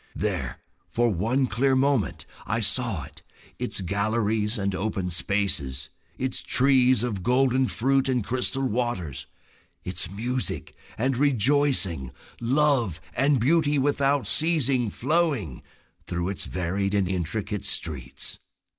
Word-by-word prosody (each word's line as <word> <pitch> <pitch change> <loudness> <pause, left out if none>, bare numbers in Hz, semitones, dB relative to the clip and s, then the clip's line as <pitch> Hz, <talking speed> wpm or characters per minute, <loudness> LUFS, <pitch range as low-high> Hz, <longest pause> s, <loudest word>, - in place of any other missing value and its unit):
There - - -2 0.3
for 120 0 +2
one 115 +9 +1
clear 130 +3 +1
moment 130 - +1 0.2
I - - 0
saw - - +1
it; - - -13 0.4
its - - -2
galleries 105 +3 0
and 100 -1 -1
open 95 -1 -2
spaces, 85 -8 -1 0.3
its 130 0 -2
trees 130 -3 +3
of 105 -6 -2
golden 130 +3 +2
fruit 135 +3 +1
and 125 -3 +1
crystal 130 +4 -1
waters, 90 - -2 0.6
its 90 -2 0
music 120 +6 -3 0.2
and 130 +3 +1
rejoicing, 125 - +2 0.3
love 125 - +2 0.2
and 140 +1 +3
beauty 150 +3 +3
without 140 0 +2
ceasing 140 -7 +2
flowing 140 - 0 0.5
through 85 +1 -2
its 100 - -4
varied 95 +3 -1
and 100 -2 +2
intricate 95 +3 -3
streets. 65 -5 -2
115 Hz, 120 wpm, -26 LUFS, 95-135 Hz, 0.6 s, trees